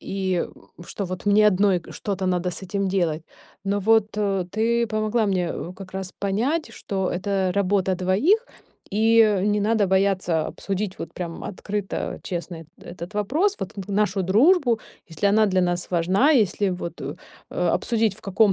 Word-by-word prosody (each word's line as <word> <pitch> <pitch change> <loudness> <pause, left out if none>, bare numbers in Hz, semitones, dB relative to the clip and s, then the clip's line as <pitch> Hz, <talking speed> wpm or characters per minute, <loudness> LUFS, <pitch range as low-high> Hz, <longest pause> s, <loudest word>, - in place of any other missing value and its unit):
И 190 -2 -1 0.4
что 200 - -5
вот 185 +2 -6
мне 210 +1 +5
одной 195 -2 +3
что-то 195 -2 -3
надо 180 0 0
с 180 - -8
этим 195 +1 -2
делать. 170 -5 0 0.4
Но 200 +1 0
вот 220 +1 +3 0.4
ты 230 +3 +1
помогла 215 +1 0
мне, 180 -4 0
э, 175 - -6
как 190 -1 -10
раз 190 -1 -5
понять, 235 +12 -1
что 190 -3 -3
это 190 0 0
работа 195 -1 +1
двоих. 275 - +2 0.5
И 220 0 +5
не 210 0 +2
надо 215 -1 +2
бояться 190 -4 +1
обсудить 195 0 -4
вот - - -7
прям 170 -2 -6
открыто, 205 0 -4
честно 175 -1 -4 0.2
это - - -14
этот 175 +3 -8
вопрос. 300 - +1
Вот 195 - -6
н 195 - -4
нашу 200 -1 +1
дружбу, 240 - +4 0.3
если 165 +4 -2
она 215 +2 +4
для 185 -1 +2
нас 175 0 -1
важна, 185 - +3
если 205 - +2
вот, 180 -1 -5
э, - - -5 0.4
э, - - 0
обсудить, 225 -4 +1
в - - -16
каком 200 +1 +3
195 Hz, 165 wpm, -24 LUFS, 185-215 Hz, 0.5 s, мне